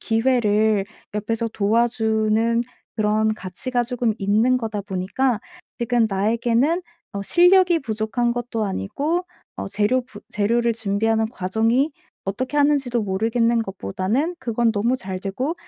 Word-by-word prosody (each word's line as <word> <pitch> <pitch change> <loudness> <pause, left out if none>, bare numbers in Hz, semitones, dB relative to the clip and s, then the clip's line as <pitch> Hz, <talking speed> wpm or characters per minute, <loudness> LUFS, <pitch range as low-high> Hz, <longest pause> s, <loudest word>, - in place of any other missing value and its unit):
기회를 220 -3 +2 0.3
옆에서 225 +2 -1
도와주는 225 +1 +1 0.3
그런 215 0 +1
가치가 240 +6 -2
쪼금 240 -2 -1
있는 220 +5 +2
거다 220 -3 -3
보니까 205 +5 -1 0.4
지금 235 -1 +2
나에게는 235 - +1 0.3
어 200 - -3
실력이 355 - +5
부족한 230 0 -1
것도 240 -2 -2
아니고 285 - -2 0.3
어 - - -4
재료 210 +6 +1
부 215 -5 -13
재료를 235 +3 +1
준비하는 220 +1 0
과정이 225 +7 +1 0.3
어떻게 255 +9 -3
하는지도 280 -5 +2
모르겠는 225 +4 +1
것보다는 200 - -2
그건 235 -1 +1
너무 230 +4 +1
잘 190 -6 -5
되고 250 - -3
225 Hz, 300 characters per minute, -22 LUFS, 210-245 Hz, 0.4 s, 실력이